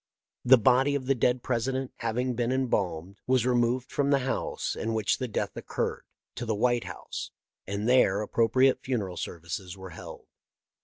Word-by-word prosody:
The 130 Hz, +1 st, +8 dB
body 130 Hz, +5 st, +4 dB
of 135 Hz, -2 st, -2 dB
the 135 Hz, -, +3 dB
dead 125 Hz, 0 st, +1 dB
President, 130 Hz, +2 st, -1 dB
having 125 Hz, +2 st, -1 dB
been 120 Hz, +1 st, -1 dB
em 130 Hz, -1 st, 0 dB
balmed, 90 Hz, -1 st, -2 dB
was 130 Hz, -2 st, +3 dB
removed 125 Hz, +1 st, +1 dB
from 140 Hz, -1 st, +1 dB
the 135 Hz, -2 st, +2 dB
house 135 Hz, -, -2 dB
in 115 Hz, 0 st, -2 dB
which 110 Hz, -2 st, +1 dB
the 130 Hz, -, -2 dB
death 110 Hz, -, -3 dB
occurred -, -, -3 dB, 0.3 s
to 120 Hz, -, -5 dB
the 110 Hz, -, 0 dB
White 120 Hz, +2 st, +1 dB
House, -, -, -6 dB, 0.4 s
and 100 Hz, +3 st, -2 dB
there 105 Hz, -5 st, +4 dB
appro 115 Hz, -1 st, +2 dB
priate 130 Hz, +1 st, +4 dB
funeral 105 Hz, -9 st, -2 dB
services 85 Hz, +3 st, -5 dB
were 95 Hz, -1 st, -9 dB
held. 80 Hz, -, -10 dB
120 Hz, 175 wpm, -28 LUFS, 105-130 Hz, 0.4 s, The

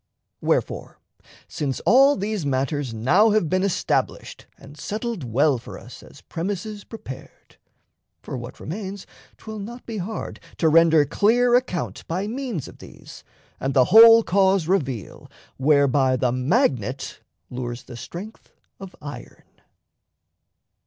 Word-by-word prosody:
Wherefore, -, -, -1 dB, 0.5 s
since 140 Hz, -3 st, -3 dB
all 275 Hz, +4 st, +5 dB
these 205 Hz, -2 st, -3 dB
matters 140 Hz, -1 st, -1 dB
now 155 Hz, -, +3 dB
have 215 Hz, -5 st, +2 dB
been 185 Hz, -, +2 dB
Established 195 Hz, -2 st, -2 dB
and 140 Hz, +1 st, -14 dB
settled 215 Hz, -, -4 dB
well 130 Hz, +3 st, +2 dB
for -, -, -10 dB
us -, -, -12 dB
As -, -, -16 dB
premises 205 Hz, +4 st, -5 dB
prepared, 135 Hz, -, -11 dB, 0.7 s
for -, -, -6 dB
what 120 Hz, 0 st, -8 dB
remains 195 Hz, +3 st, -6 dB, 0.3 s
'Twill 220 Hz, -1 st, -8 dB
not 235 Hz, +5 st, -8 dB
be 225 Hz, -3 st, -5 dB
hard 210 Hz, +5 st, -5 dB, 0.2 s
to 160 Hz, -, +3 dB
render 160 Hz, -1 st, +5 dB
clear 235 Hz, -, +2 dB
account 245 Hz, -9 st, 0 dB
By 180 Hz, +4 st, -2 dB
means 235 Hz, -, -4 dB
of -, -, -14 dB
these, -, -, -13 dB, 0.4 s
and 135 Hz, +1 st, -2 dB
the 130 Hz, -2 st, +6 dB
whole 230 Hz, +1 st, +9 dB
cause 190 Hz, -3 st, +2 dB
reveal 135 Hz, -, -2 dB, 0.3 s
Whereby 140 Hz, -2 st, +3 dB
the 125 Hz, -1 st, 0 dB
magnet 130 Hz, -, -1 dB, 0.3 s
lures 125 Hz, -1 st, -5 dB
the 120 Hz, -, -11 dB
strength 185 Hz, -, -9 dB, 0.3 s
of 195 Hz, -1 st, -10 dB
iron. 145 Hz, 0 st, -9 dB
170 Hz, 130 wpm, -23 LUFS, 135-215 Hz, 0.7 s, whole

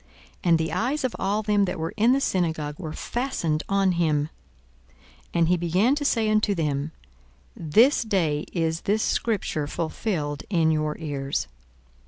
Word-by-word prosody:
And 170 Hz, -2 st, +4 dB
the 160 Hz, 0 st, -2 dB
eyes 250 Hz, -, 0 dB
of 255 Hz, -, -1 dB
all 205 Hz, +3 st, 0 dB
them 205 Hz, -1 st, +2 dB
that 185 Hz, -, -3 dB
were 160 Hz, 0 st, -3 dB
in 225 Hz, +3 st, +4 dB
the 270 Hz, -, +3 dB
synagogue 160 Hz, -, -1 dB
were 160 Hz, -4 st, -5 dB
fastened 170 Hz, -, -2 dB
on 195 Hz, -1 st, +3 dB
him. 155 Hz, -3 st, +1 dB, 0.6 s
42:004:021 65 Hz, -, -30 dB, 0.4 s
And 170 Hz, -1 st, +3 dB
he 180 Hz, -, +3 dB
began 180 Hz, +9 st, +2 dB
to 290 Hz, 0 st, -1 dB
say 225 Hz, -5 st, +2 dB
unto 215 Hz, -1 st, +2 dB
them, 150 Hz, -2 st, -1 dB, 0.6 s
This 220 Hz, -, +4 dB
day 170 Hz, -9 st, 0 dB
is 165 Hz, -1 st, -1 dB
this 215 Hz, +2 st, +1 dB
scripture 190 Hz, -9 st, -1 dB
fulfilled 155 Hz, -2 st, -3 dB
in 165 Hz, -5 st, +3 dB
your 155 Hz, -1 st, -1 dB
ears. 140 Hz, -3 st, -3 dB
170 Hz, 160 wpm, -25 LUFS, 155-215 Hz, 0.6 s, And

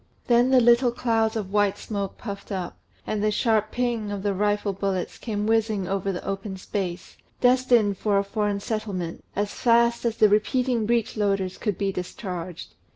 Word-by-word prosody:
Then 240 Hz, +1 st, +4 dB
the 260 Hz, -1 st, +6 dB
little 240 Hz, +1 st, +5 dB
clouds 225 Hz, -2 st, 0 dB
of 200 Hz, -3 st, -4 dB
white 205 Hz, -1 st, +2 dB
smoke 200 Hz, -3 st, -4 dB
puffed 200 Hz, -3 st, -7 dB
up, 185 Hz, -3 st, -4 dB, 0.3 s
and 210 Hz, -1 st, -2 dB
the 215 Hz, -, +3 dB
sharp 215 Hz, 0 st, +1 dB
"ping" 240 Hz, -4 st, -1 dB
of 200 Hz, -1 st, -4 dB
the 205 Hz, -1 st, +1 dB
rifle 205 Hz, +1 st, 0 dB
bullets 195 Hz, -1 st, -3 dB
came 210 Hz, -3 st, -3 dB
whizzing 220 Hz, -3 st, +1 dB
over 195 Hz, 0 st, -1 dB
the 180 Hz, -, -6 dB
open 195 Hz, 0 st, -4 dB
space, 185 Hz, -2 st, -5 dB, 0.2 s
destined 245 Hz, -5 st, +3 dB
for 205 Hz, -2 st, +2 dB
a 200 Hz, -, +2 dB
foreign 205 Hz, 0 st, -1 dB
settlement, 200 Hz, -7 st, -4 dB
as 205 Hz, +1 st, -1 dB
fast 235 Hz, 0 st, +3 dB
as 230 Hz, -2 st, -1 dB
the 215 Hz, -, +6 dB
repeating 230 Hz, +2 st, +1 dB
breech 235 Hz, -1 st, 0 dB
loaders 195 Hz, -3 st, 0 dB
could 210 Hz, -5 st, -1 dB
be 200 Hz, -1 st, 0 dB
discharged. 180 Hz, -2 st, -6 dB
210 Hz, 175 wpm, -25 LUFS, 195-230 Hz, 0.3 s, the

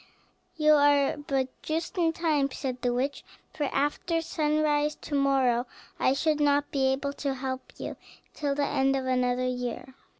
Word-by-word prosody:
"You 305 Hz, -1 st, +5 dB
are 285 Hz, -1 st, +4 dB
but 275 Hz, -3 st, -1 dB
just 325 Hz, +5 st, -3 dB
in 335 Hz, -3 st, +2 dB
time," 310 Hz, -4 st, +1 dB
said 255 Hz, -2 st, -4 dB
the 245 Hz, -, +1 dB
witch; 265 Hz, +4 st, -2 dB, 0.3 s
"for 295 Hz, -, -1 dB
after 295 Hz, +5 st, 0 dB
sunrise 300 Hz, -2 st, +1 dB
to -, -, -8 dB
morrow 265 Hz, -3 st, +2 dB, 0.3 s
I 260 Hz, -, +3 dB
should 305 Hz, +2 st, +1 dB
not 290 Hz, 0 st, +2 dB
be 270 Hz, -2 st, +2 dB
able 275 Hz, +1 st, -1 dB
to 275 Hz, -2 st, -1 dB
help 260 Hz, 0 st, -5 dB
you -, -, -6 dB, 0.4 s
till 285 Hz, -2 st, -1 dB
the 285 Hz, 0 st, +1 dB
end 270 Hz, 0 st, +1 dB
of 265 Hz, -1 st, -2 dB
another 250 Hz, -1 st, +1 dB
year. 250 Hz, +1 st, -4 dB
280 Hz, 165 wpm, -28 LUFS, 265-300 Hz, 0.4 s, You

